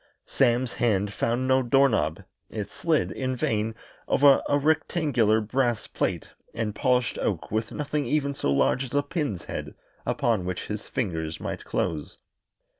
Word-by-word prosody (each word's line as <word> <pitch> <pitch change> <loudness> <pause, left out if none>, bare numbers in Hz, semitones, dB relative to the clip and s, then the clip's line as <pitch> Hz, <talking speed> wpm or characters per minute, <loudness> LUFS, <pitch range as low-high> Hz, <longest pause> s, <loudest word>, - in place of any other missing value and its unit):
Sam's 125 -1 +2
hand 105 -3 +1
found 120 +5 0
no 130 0 +4
door 135 +3 +4
knob 85 - 0 0.3
it 105 -2 -5
slid, 155 +2 +1
in 130 -1 -2
vain, 110 -2 -1 0.3
over 140 -1 +6
a 145 - +4
rectangular 145 -7 +2
brass 120 +1 0
plate - - -2 0.3
and 115 -2 -2
polished 125 +2 +1
oak - - -2
with 110 0 -1
nothing 150 -2 -2
even 140 +1 +1
so 70 - -1
large 70 - +2
as 135 +1 -6
a 145 - +3
pin's 145 - -3
head - - -6 0.3
upon 110 -6 +1
which 90 0 -4
his 105 0 -5
fingers 80 -8 -3
might - - -5
close. 75 -3 -2
120 Hz, 155 wpm, -26 LUFS, 105-140 Hz, 0.3 s, over